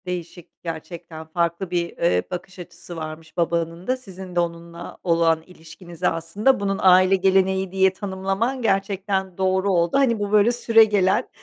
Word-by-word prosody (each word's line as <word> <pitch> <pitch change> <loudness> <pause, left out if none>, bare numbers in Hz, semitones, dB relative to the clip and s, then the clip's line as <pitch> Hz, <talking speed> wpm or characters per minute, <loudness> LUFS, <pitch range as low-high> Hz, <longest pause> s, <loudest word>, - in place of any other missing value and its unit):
Değişik, 175 -1 -7
gerçekten 165 -1 -7
farklı 170 +2 -2
bir, 170 -1 -2
ııı, 90 - +2
bakış 180 +1 -7
açısı 175 0 -10
varmış 160 0 -8
babanın 170 0 -1
da 255 +1 +1
sizin 190 -6 -10
de - - +2
onunla 170 0 -5
olan 165 -2 +2
ilişkinizi 170 0 -6
aslında 195 +11 +1
bunun 195 -1 -1
aile 185 +1 +6
geleneği 190 0 +2
diye 190 0 +3
tanımlaman 195 +6 -2
gerçekten 195 -3 -1
doğru 190 +1 +1
oldu. 170 +5 +2
Hani 245 -5 +2
bu 205 0 -3
böyle 210 +2 +5
süregelen 225 -3 +3
185 Hz, 145 wpm, -22 LUFS, 170-195 Hz, -, aile